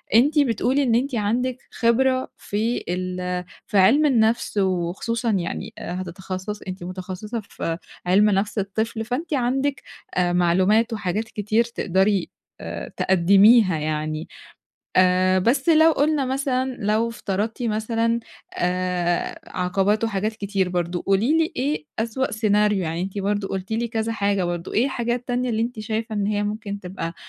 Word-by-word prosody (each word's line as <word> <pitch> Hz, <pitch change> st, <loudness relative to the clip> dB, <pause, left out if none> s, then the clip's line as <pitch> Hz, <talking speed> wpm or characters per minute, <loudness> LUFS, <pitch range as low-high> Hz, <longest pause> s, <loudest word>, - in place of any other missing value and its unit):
أنتِ 290 Hz, +6 st, +5 dB
بتقولي 260 Hz, +1 st, +2 dB
إن 235 Hz, -4 st, +2 dB
أنتِ 260 Hz, +2 st, 0 dB
عندِك 240 Hz, +4 st, 0 dB
خبرة 255 Hz, +2 st, +2 dB
في 220 Hz, +4 st, -2 dB
ال 180 Hz, 0 st, -2 dB, 0.2 s
في 210 Hz, -, 0 dB
علم 235 Hz, +11 st, +5 dB
النفس، 230 Hz, -5 st, +2 dB
وخصوصًا 195 Hz, +5 st, 0 dB
يعني 180 Hz, -5 st, -3 dB
هتتخصصي 185 Hz, +3 st, -5 dB
أنتِ 185 Hz, -1 st, -6 dB
متخصصة 185 Hz, +5 st, -5 dB
في 165 Hz, 0 st, -3 dB, 0.3 s
علم 200 Hz, +4 st, +4 dB
نفس 205 Hz, +2 st, 0 dB
الطفل 220 Hz, +3 st, -2 dB
فأنتِ 275 Hz, +8 st, -3 dB
عندِك 270 Hz, +2 st, 0 dB, 0.3 s
آآ 180 Hz, -1 st, +2 dB
معلومات 190 Hz, +7 st, +3 dB
وحاجات 210 Hz, 0 st, -1 dB
كتير 220 Hz, +1 st, 0 dB
تقدري 195 Hz, -4 st, 0 dB, 0.3 s
آآ -, -, -6 dB
تقدميها 195 Hz, +2 st, +5 dB
يعني، 155 Hz, +1 st, -3 dB, 0.7 s
آآ 185 Hz, 0 st, +4 dB
بس 250 Hz, -, +1 dB
لو 320 Hz, 0 st, +6 dB
قُلنا 295 Hz, -1 st, +1 dB
مثلًا 260 Hz, -1 st, -1 dB
لو 215 Hz, +3 st, +1 dB
افترضتِ 220 Hz, +1 st, -3 dB
مثلًا 230 Hz, +1 st, 0 dB, 0.3 s
آآ 180 Hz, -1 st, -1 dB, 0.2 s
عقبات 195 Hz, +4 st, +1 dB
وحاجات 215 Hz, 0 st, -1 dB
كتير 195 Hz, -2 st, -1 dB
برضو، 175 Hz, -1 st, -2 dB
قولي 220 Hz, +11 st, +2 dB
لي 325 Hz, -1 st, +1 dB
إيه 285 Hz, +4 st, -1 dB
أسوأ 230 Hz, +4 st, -1 dB
سيناريو 210 Hz, -1 st, +2 dB
يعني 165 Hz, 0 st, -2 dB
أنتِ 195 Hz, +2 st, -4 dB
برضو 200 Hz, 0 st, -1 dB
قلتِ 190 Hz, +2 st, -4 dB
لي 235 Hz, +2 st, 0 dB
كذا 225 Hz, 0 st, -2 dB
حاجة 200 Hz, -3 st, 0 dB
برضو، 175 Hz, 0 st, -4 dB
إيه 230 Hz, -, +3 dB
الحاجة 240 Hz, -3 st, -1 dB
التانية 245 Hz, 0 st, -2 dB
اللي 225 Hz, -1 st, 0 dB
أنتِ 235 Hz, -1 st, -3 dB
شايفة 220 Hz, +1 st, -3 dB
إن 205 Hz, -1 st, 0 dB
هي 205 Hz, 0 st, 0 dB
ممكن 205 Hz, -1 st, -4 dB
تبقى 180 Hz, -3 st, -5 dB
210 Hz, 145 wpm, -23 LUFS, 185-235 Hz, 0.7 s, لو